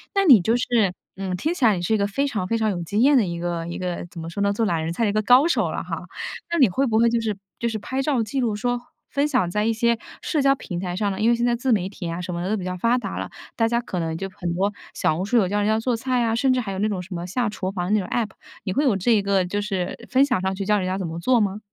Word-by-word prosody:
那 395 - +4
你 260 - +9
就 225 +7 +2
是， 230 -6 +2 0.2
嗯， 190 -1 -3
听 315 - -1
起 270 -8 +1
来 215 - +5
你 175 - -3
是 200 +5 0
一 - - +4
个 200 -1 +1
非 275 +8 0
常 215 -9 -2
非 230 +3 +1
常 220 -1 +1
有 175 -2 -3
经 205 +7 0
验 280 +1 +6
的 225 - +3
一 170 -1 -4
个 170 -1 -3
一 170 - -5
个 180 -2 -3
怎 170 - -10
么 165 - -6
说 200 - -4
呢， 200 0 +2
做 225 +2 0
懒 165 -5 0
人 165 +1 -2
菜 230 - -1
的 210 - +3
一 - - -1
个 215 - +2
高 250 +7 +6
手 340 - +1
了 - - -3
哈。 - - -5 0.5
那 340 - +1
你 255 - +6
会 265 +9 +1
不 220 - +1
会 235 +1 +5
就 235 - +1
是 215 -3 -2 0.2
就 235 - 0
是 225 - -2
拍 260 +6 -3
照 270 -5 +1
记 265 +6 -3
录 230 -5 0
说 245 +3 -1 0.3
分 285 +1 +1
享 250 -12 +1
在 210 +2 0
一 225 - +2
些 235 +1 +2 0.3
社 305 - 0
交 275 0 +5
平 175 -9 -6
台 180 -1 -3
上 205 0 0
呢， 190 - -5
因 225 - +4
为 235 - +4
现 240 +1 0
在 240 - +2
自 250 +2 -1
媒 190 -4 +2
体 190 -3 -7
啊 170 - -4
什 180 0 -4
么 170 - -3
的 185 - -2
都 215 - +1
比 185 - -5
较 185 - -3
发 230 +6 +2
达 245 - -4
了， - - -4 0.3
大 225 -1 +2
家 235 +1 +1
可 185 -6 -4
能 160 -1 -2
就 195 - -4
很 175 -2 -4
多 195 +3 +1 0.2
小 155 - +1
红 180 - -2
书 240 +4 +2
有 195 - +4
教 205 +3 -1
人 205 - +1
家 220 0 +2
做 240 +1 0
菜 250 +1 0
啊， 225 - +1
甚 265 +2 +2
至 255 - +2
还 210 -5 -3
有 190 - -4
那 215 - +2
种 200 -3 -2
什 185 +2 -9
么 175 0 -4
下 235 +6 0
厨 190 -2 -3
房 185 +1 -2
那 215 - +4
种 185 - -4
APP， 225 -3 0 0.3
你 190 -3 -2
会 285 - +1
有 245 -9 +3
这 200 +6 +1
一 215 -3 +4
个 195 -2 +1
就 205 +3 -2
是 190 -3 -2
分 265 +2 +4
享 250 -9 0
上 190 0 -1
去 195 0 -4
教 210 0 +3
人 185 - -2
家 185 - -1
怎 190 - -3
么 165 +1 -5
做 250 +7 +3
吗？ 205 -1 0
210 Hz, 365 characters per minute, -23 LUFS, 185-240 Hz, 0.5 s, 你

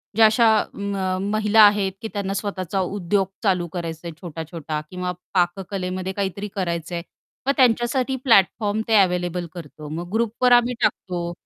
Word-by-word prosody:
ज्या 225 0 +7
अशा 225 +2 +5
अ, - - +1
म 195 -1 -2
महिला 215 0 +4
आहेत 205 -2 +5
की 220 - -4
त्यांना 195 -1 -2
स्वतःचा 195 -2 -3
उद्योग 190 0 0 0.2
चालू 180 -4 +1
करायच 165 -2 -4
आहे 170 -1 -6
छोटा-छोटा 160 -2 -5
किंवा 180 0 -3 0.2
पाककलेमध्ये 185 +1 -1
काहीतरी 200 +1 -3
करायचंय 170 -2 -2 0.5
मग - - +5
त्यांच्यासाठी 250 +1 +2
प्लॅटफॉर्म 215 -2 +3
ते 225 - +3
अव्हेलेबल 180 -1 0
करतो 155 -3 -9
मग 170 +3 -5
ग्रुपवर 235 +2 +1
आम्ही 245 0 +5
टाकतो, 175 -2 -1
190 Hz, 145 wpm, -22 LUFS, 175-210 Hz, 0.5 s, ज्या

